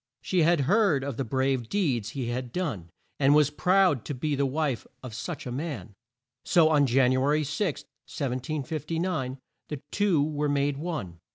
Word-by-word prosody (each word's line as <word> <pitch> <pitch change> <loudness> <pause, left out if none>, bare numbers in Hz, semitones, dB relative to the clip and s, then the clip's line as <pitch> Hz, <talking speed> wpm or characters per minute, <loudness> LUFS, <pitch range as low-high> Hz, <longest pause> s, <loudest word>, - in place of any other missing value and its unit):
She 185 -2 +1
had 165 -1 +4
heard 175 - +3
of 140 -4 -4
the 135 - 0
brave 130 0 0
deeds 130 - 0
he 125 -3 -4
had 125 0 -3
done, 125 - -3 0.3
and 140 +1 +5
was 150 -1 +4
proud 180 - +3
to 145 - -4
be 150 +4 -1
the 140 0 +1
wife 140 -3 -1 0.2
of 125 -3 -7
such 150 +6 -5
a 125 - -4
man, 125 - -5 0.5
so 165 -4 +4
on 145 -3 +4
Jan 125 +1 +4
u 130 0 +2
a 135 - +2
ry 150 +1 +2
6, 155 +3 -2 0.2
1759, 145 +2 -3 0.3
the 150 - -4
two 190 -8 +2
were 150 -1 -1
made 140 0 +1
one. 145 - -5
145 Hz, 180 wpm, -27 LUFS, 130-160 Hz, 0.5 s, and